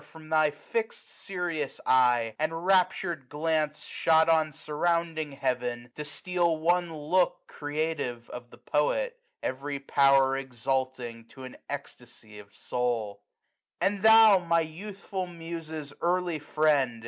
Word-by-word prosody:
From 160 -1 -13
thy 155 -1 +4
fixM 220 +9 -3
serious 175 -7 -5
eye, 120 -3 +3
and 155 +1 0
raptur'd 175 -4 +1
glance 155 0 -1
Shot 160 0 +3
on 160 -1 +3
surrounding 160 0 -1
Heaven, 125 -3 -2
to 150 - -6
steal 170 +2 -1
one 175 +2 +1
look 160 +4 0
Creative 145 -5 -3
of 120 0 -8
the - - -15
Poet, 485 - 0 0.2
every 140 +2 -3
power 135 -1 +4
Exalting 130 -2 -3
to 130 +3 -13
an 130 - -9
ecstasy 105 -1 -9
of 100 -1 -14
soul. 115 -5 -2 0.6
2q 180 - +4
And 200 -1 -6
thou, 220 -2 +8
my 170 -1 +2
youthful 190 +3 -6
Muse's 165 -3 -7
early 175 -2 0
friend. 145 -5 +1
155 Hz, 125 wpm, -28 LUFS, 130-170 Hz, 0.6 s, thou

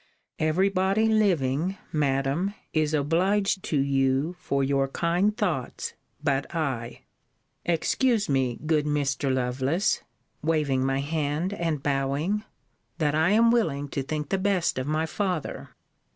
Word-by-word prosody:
Every 160 +5 +2
body 195 +3 +2
living, 185 -5 +1
Madam, 145 +6 0 0.2
is 155 -1 +1
obliged 190 +7 +1
to 150 - 0
you 135 +4 +1
for 140 -5 0
your 135 0 +1
kind 175 +8 +1
thoughts 170 - -2 0.3
but 140 +4 -1
I. 130 -7 -2 0.6
Excuse 215 - +1
me, 130 -4 +1
good 155 -1 +2
Mr. 140 -2 0
Lovelace 130 +9 0 0.4
[waving 150 -4 +1
my 135 +1 +1
hand, 155 +4 -1
and 165 -7 -2
bowing], 145 +9 0 0.5
that 150 -3 +1
I 160 +2 +3
am 230 +2 +5
willing 145 -12 0
to 140 - -2
think 150 +2 -4
the 195 - 0
best 190 -7 +1
of 130 - -3
my 155 +1 +1
father. 180 -2 -3
155 Hz, 130 wpm, -26 LUFS, 135-185 Hz, 0.6 s, am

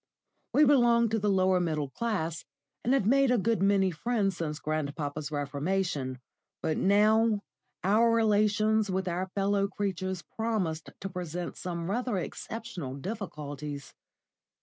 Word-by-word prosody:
We 300 - +6
belonged 240 -5 +4
to 225 - +1
the 210 0 +1
lower 185 -1 +3
middle 155 -5 -1
class, 175 -8 -2 0.4
and 245 - +1
had 270 -7 +3
made 270 +4 +4
a 250 - +4
good 225 +1 +1
many 195 -1 +3
friends 200 +2 0
since 150 -2 -3
grandpapa's 150 -1 -3
reformation; 145 -1 -1 0.5
but 155 - +1
now 215 +2 +3 0.4
our 215 +5 +4
relations 215 -1 +3
with 190 0 -1
our 180 +2 -1
fellow 200 0 +2
creatures 190 -3 -3
promised 200 -9 -1
to 195 - -3
present 175 -2 -5
some 170 -2 -4
rather 235 +1 -1
exceptional 185 - -5
difficulties. 145 - -6
195 Hz, 130 wpm, -29 LUFS, 160-220 Hz, 0.5 s, We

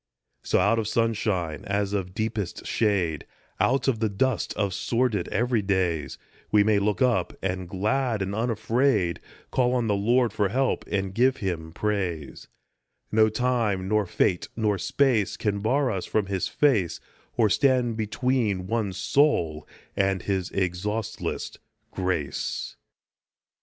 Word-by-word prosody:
So - - +1
out 105 +5 +3
of 110 - -2
sunshine 105 -9 0
as 100 0 -1
of 95 -2 -3
deepest 110 -4 -3
shade, 95 - 0 0.3
Out 135 +2 +2
of 125 -5 +1
the 110 -1 +1
dust 130 +7 0
of 100 -3 -1
sordid 115 -3 0
every 120 0 +1
days, 90 -7 -1 0.3
We 105 -1 +5
may 105 -1 +3
look 100 +2 +1
up, 115 -9 +1
and, 95 -2 -2
glad 110 +3 0
and 95 +1 -4
unafraid, 115 -3 +1 0.3
Call 125 -1 +2
on 120 -2 +1
the 105 - +1
Lord 115 +3 +2
for 105 -2 +1
help, 130 +5 0
and 95 -1 -1
give 125 +5 +3
him 85 -5 -3
praise; 90 -6 -3 0.6
No 110 0 +5
time 110 -5 0
nor 105 -1 +1
fate 90 0 +1
nor 105 -4 0
space 120 -3 +1
can 100 -2 -1
bar 130 +6 +1
us 95 -3 -3
from 110 -2 +1
his 95 -1 -1
face, 110 - +1 0.4
Or 115 -3 +5
stand 125 +1 +2
between 110 -3 0
one 105 -1 -1
soul 85 - +1 0.3
and 95 -2 +1
his 95 -2 -1
exhaustless 100 +4 -3 0.3
grace. 90 -6 -2
105 Hz, 140 wpm, -26 LUFS, 95-115 Hz, 0.6 s, We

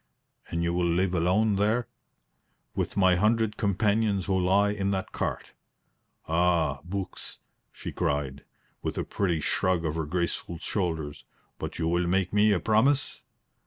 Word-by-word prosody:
"And 85 0 -1
you 85 0 0
will 90 0 +1
live 90 +2 +1
alone 95 +5 +2
there?" 110 +4 +1 0.9
"With - - -2
my 95 -2 +5
hundred 110 +2 +2
companions 105 -1 +1
who 95 - +1
lie 100 +3 +3
in 100 -1 -1
that 95 -1 -2
cart." - - -3 0.8
"Ah, 85 -4 +2
books!" 95 +1 -5 0.3
she - - -7
cried, 70 -1 -2 0.4
with - - -3
a - - 0
pretty 90 -6 -1
shrug 90 0 +1
of 75 - 0
her 80 -1 -2
graceful 85 0 -2
shoulders. 80 -5 -3 0.4
"But - - -5
you 80 - 0
will 85 +1 +1
make 95 +1 +1
me 105 +1 +5
a 100 - +3
promise?" 130 +8 +2
95 Hz, 150 wpm, -27 LUFS, 85-105 Hz, 0.9 s, my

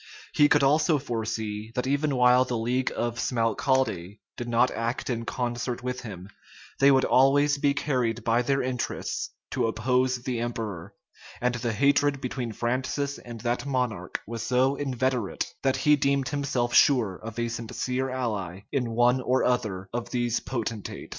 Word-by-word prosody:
He 145 0 +5
could 145 - +4
also 155 +3 +4
foresee, 110 -4 -4
that 125 - -1
even 140 +1 +1
while 125 0 +5
the 125 -2 -3
league 125 +3 0
of 120 0 -2
Smalcalde 115 -5 0 0.2
did 120 - -5
not 120 +2 +3
act 115 +3 -2
in 115 -1 -3
concert 120 0 -3
with 125 0 -3
him, 95 -5 -8 0.5
they 140 - +6
would 135 -1 +4
always 145 +2 +4
be 140 0 +2
carried 120 -6 -1
by 115 +1 +2
their 135 +2 +1
interests 125 -1 -3 0.2
to - - +1
oppose 125 +2 0
the 125 -2 -2
emperor: 105 -6 -4 0.4
and 125 0 +1
the 120 -1 -2
hatred 140 +3 +2
between 125 -2 -4
Francis 130 +5 -2
and 120 -2 -9
that 120 +3 -1
monarch 125 -9 -2
was 115 +1 -5
so 130 +2 +2
inveterate, 130 -5 -1 0.2
that 135 -1 +1
he 150 0 +4
deemed 140 -2 +1
himself 135 -4 -1
sure 120 -10 +4
of 115 0 -9
a 120 0 0
sincere 125 +3 -3
ally 105 -8 -3
in 125 -4 0
one 120 +2 +4
or 130 +1 +1
other 105 -7 0
of 120 0 -3
these 120 -2 0
potentates. 115 -4 -5
125 Hz, 160 wpm, -27 LUFS, 115-130 Hz, 0.5 s, they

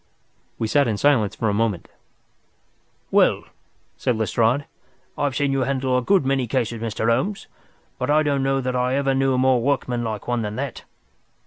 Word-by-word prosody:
We 110 - -1
sat 140 +3 +3
in 110 -3 -1
silence 120 -6 +2
for 110 - -1
a 105 - +1
moment. 105 -4 -1 1.2
"Well," - - +3 0.5
said 120 - 0
Lestrade, 115 +5 +1 0.5
"I've 140 -2 -1
seen 145 -1 +1
you 135 - 0
handle 130 -1 0
a 125 - +2
good 185 +3 +2
many 135 -2 0
cases, 115 -1 -2
Mr. 110 0 -2
Holmes, 180 - 0 0.5
but - - -2
I 155 +1 +4
don't 140 -2 0
know 135 0 +1
that 130 0 -2
I 125 +1 +1
ever 135 -1 +1
knew 135 0 +1
a - - 0
more 130 -1 +3
workmanlike 120 -5 -2
one 120 -1 0
than 105 -1 -4
that. 135 0 -5
130 Hz, 180 wpm, -22 LUFS, 115-135 Hz, 1.2 s, I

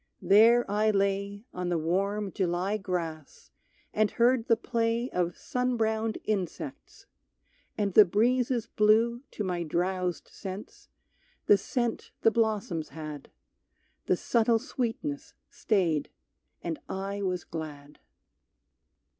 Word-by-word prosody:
There 230 +4 +6
I 210 +2 +2
lay 200 +1 0
On 180 -1 -3
the 175 - +1
warm 195 +5 -1
July 185 +2 0
grass 170 -6 -5 0.4
and 215 0 +3
heard 240 0 +2
the 230 - +4
play 230 +1 -1
Of 175 -1 -1
sun 250 -1 -1
browned 220 0 0
insects, 185 -9 -4 0.7
and 200 -2 0
the 215 - +10
breezes 235 +5 +1
blew 225 +3 +3
To 210 - -4
my 180 -3 -2
drowsed 180 +2 -1
sense 195 +1 -9 0.6
the - - +7
scent 235 +4 -2
the 225 - +5
blossoms 210 -8 0
had; 155 -3 -8 0.8
The - - +3
subtle 230 -1 +2
sweetness 255 +5 -4 0.2
stayed, 175 -9 0 0.5
and 165 -2 -3
I 195 +1 -3
was 185 -3 -1
glad. 150 -3 -8
200 Hz, 115 wpm, -28 LUFS, 180-225 Hz, 0.8 s, the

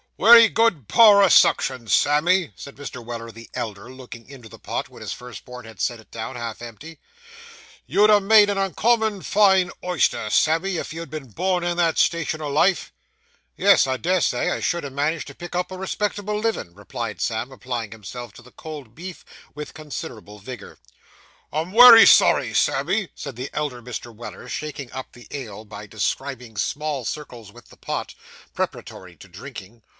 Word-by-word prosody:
'Wery 230 +1 +8
good 205 - +1
power 210 -3 +7
o' 195 - +5
suction, 130 -7 +3
Sammy,' 160 - +2
said 140 - -11
Mr. 135 -3 -8
Weller 115 0 -7
the 115 +1 -13
elder, 105 +2 -6
looking 125 -2 -12
into 125 -5 -12
the - - -14
pot, - - -4
when - - -15
his - - -5
first 125 -1 -11
born 125 -1 -10
had 110 -4 -11
set 120 -2 -1
it 110 - -19
down 115 +3 -6
half 115 -2 -6
empty. 120 +8 -11 0.9
'You'd 210 +1 +4
ha' 210 - +6
made 210 +1 +6
an 200 - -1
uncommon 215 +1 +1
fine 190 -3 +3
oyster, 175 -10 0
Sammy, 165 - +1
if - - -5
you'd 165 -1 -7
been 145 -3 -8
born 180 - -1
in 175 0 -2
that 165 -2 +1
station 165 -2 +1
o' 150 - -4
life.' 170 +6 +1 0.7
'Yes, 200 -6 +5
I 130 0 -1
des 180 +5 0
say, - - 0
I - - -2
should 175 -1 -1
ha' 140 - -6
managed 150 +4 -1
to 140 - -11
pick 175 0 -9
up 180 +1 -2
a 185 - -6
respectable 205 +2 -3
livin',' 215 - -3
replied 105 0 -6
Sam 115 +3 -2
applying 125 -5 -5
himself 115 +3 -9
to 120 - -15
the 125 - -17
cold 150 -8 -10
beef, 180 +5 -10 0.3
with 150 0 -8
considerable 115 -8 -8
vigour. 105 0 -10 0.7
'I'm 160 +4 -3
wery 235 +1 +10
sorry, - - +5
Sammy,' 205 -5 +1
said 140 -4 -7
the 125 +3 -6
elder 145 -5 -3
Mr. 120 0 -8
Weller, 120 +2 -10
shaking 145 -2 -6
up 130 - -8
the 120 -3 -15
ale, 110 -6 -7
by 105 0 -10
describing 120 +2 -4
small 145 +4 -2
circles 120 -6 -7
with 120 +3 -17
the - - -18
pot, - - -5 0.4
preparatory - - -6
to - - -14
drinking. 110 +5 -11
140 Hz, 180 wpm, -22 LUFS, 120-180 Hz, 0.9 s, wery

